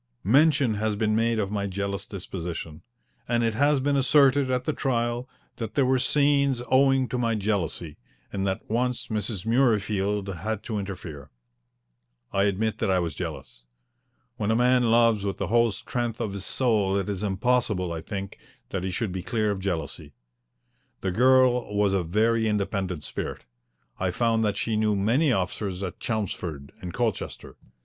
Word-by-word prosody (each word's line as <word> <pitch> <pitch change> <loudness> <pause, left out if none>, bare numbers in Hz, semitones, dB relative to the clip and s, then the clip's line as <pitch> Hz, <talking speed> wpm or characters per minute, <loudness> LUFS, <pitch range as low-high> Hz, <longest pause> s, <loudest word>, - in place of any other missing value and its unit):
Mention 140 - +4
has 110 -1 0
been 110 0 +1
made 115 +1 +2
of 100 -2 -1
my 100 -1 -1
jealous 100 0 -3
disposition, 85 -5 -6 0.5
and 120 -1 +1
it 115 -1 +1
has 145 +4 +3
been 140 +2 +1
asserted 135 0 +4
at 125 -1 0
the 155 - 0
trial 120 -2 -1 0.3
that 115 -3 -5
there 140 - +3
were 130 0 +3
scenes 140 -1 +2
owing 135 -1 +4
to 125 +2 -3
my 115 -2 +1
jealousy, 95 -7 -2 0.4
and 100 -1 -1
that 95 0 -3
once 125 +2 -1
Mrs. 105 -3 -2
Murreyfield 105 -5 +1
had 110 +2 -3
to 110 -2 -3
interfere. 90 -8 -7 1.0
I 100 0 +3
admit 105 +2 0
that - - 0
I 95 - +3
was 85 -4 -1
jealous. - - -7 0.7
When 105 -1 -1
a 110 - +3
man 125 +1 +4
loves 115 -3 +4
with 100 -1 -2
the 100 - -3
whole 115 0 +4
strength 120 +3 -3
of 110 -4 -2
his 100 -1 -5
soul 105 -6 +1
it 95 - -2
is 100 -2 -3
impossible, 105 -3 0
I 80 - -4
think, 100 +2 -6 0.3
that 95 - -3
he 95 - -1
should 95 +3 -2
be 95 0 -4
clear 110 +1 0
of 100 - -3
jealousy. 80 -5 -4 0.9
The 95 - -1
girl 125 0 +4
was 100 -1 +3
of 90 -4 0
a - - -11
very 110 +3 +2
independent 100 -5 -1
spirit. - - -5 0.5
I 95 - 0
found 115 +4 +1
that 105 -1 0
she 110 -2 0
knew 105 -1 +2
many 120 +10 +2
officers 95 -2 -2
at 95 0 -5
Chelmsford 90 -10 -4
and 90 - -5
Colchester. 120 0 -3
105 Hz, 170 wpm, -26 LUFS, 95-120 Hz, 1.0 s, Mention